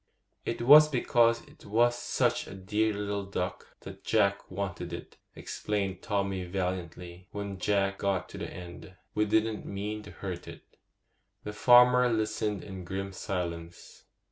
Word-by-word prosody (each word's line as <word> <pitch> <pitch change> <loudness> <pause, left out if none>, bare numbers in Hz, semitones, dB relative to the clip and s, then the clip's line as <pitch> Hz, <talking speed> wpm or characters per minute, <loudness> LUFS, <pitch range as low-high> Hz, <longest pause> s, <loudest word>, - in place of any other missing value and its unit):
'It 115 - -2
was 150 +4 +9
because 120 -3 +3
it - - -19
was 120 +4 +3
such - - 0
a - - -8
dear 105 +3 0
little 100 -1 -3
duck 95 -2 -5
that - - -10
Jack 100 -3 +1
wanted 95 -1 -4
it,' - - -8 0.2
explained 100 -3 -3
Tommy 100 -3 -1
valiantly, 90 -1 -4
when 100 -2 -5
Jack 100 0 +1
got 95 -3 0
to - - -8
the - - -5
end. 90 +1 -10 0.2
'We 105 - +2
didn't 110 +1 0
mean 105 +2 -4
to 105 - -12
hurt 90 -3 -6
it.' - - -12 0.7
The 105 - -5
farmer 125 +2 +6
listened 110 -3 -1
in 95 -2 -8
grim 95 +2 -4
silence. 85 -3 -5
100 Hz, 145 wpm, -29 LUFS, 95-110 Hz, 0.7 s, was